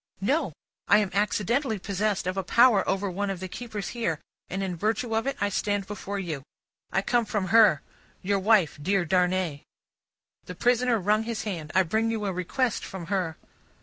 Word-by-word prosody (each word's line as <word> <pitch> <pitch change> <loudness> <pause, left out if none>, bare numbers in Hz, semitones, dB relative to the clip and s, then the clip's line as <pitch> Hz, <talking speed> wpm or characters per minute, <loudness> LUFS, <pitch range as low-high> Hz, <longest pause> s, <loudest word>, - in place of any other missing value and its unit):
"No. 265 - +1 0.4
I 205 - +6
am 205 -3 +1
accidentally 215 +5 +1
possessed 200 +1 -1
of 185 +1 -1
a 195 - 0
power 235 +1 +5
over 195 +1 0
one 200 +2 -2
of 195 -2 -3
the 185 - -5
keepers 215 0 -6
here, 195 -11 -2 0.3
and 195 +1 -2
in 185 -2 -2
virtue 220 +5 -1
of 225 +4 0
it 275 - -1
I 205 - +1
stand 205 0 -1
before 200 0 -5
you. 165 -7 -4 0.5
I 190 - +1
come 240 +3 +2
from 205 -4 -2
her 210 -8 +6 0.4
your 200 +1 +1
wife, 190 -7 +3
dear 190 +3 +1
Darnay." 180 -3 +1 0.8
The 180 - -8
prisoner 245 +3 +2
wrung 210 +3 +2
his 230 -2 -3
hand. 165 -7 -5
"I 190 - +6
bring 220 +6 0
you 220 -2 -2
a 195 - -1
request 215 +7 -1
from 190 -3 -7
her." 175 -5 -1
200 Hz, 185 wpm, -27 LUFS, 185-225 Hz, 0.8 s, I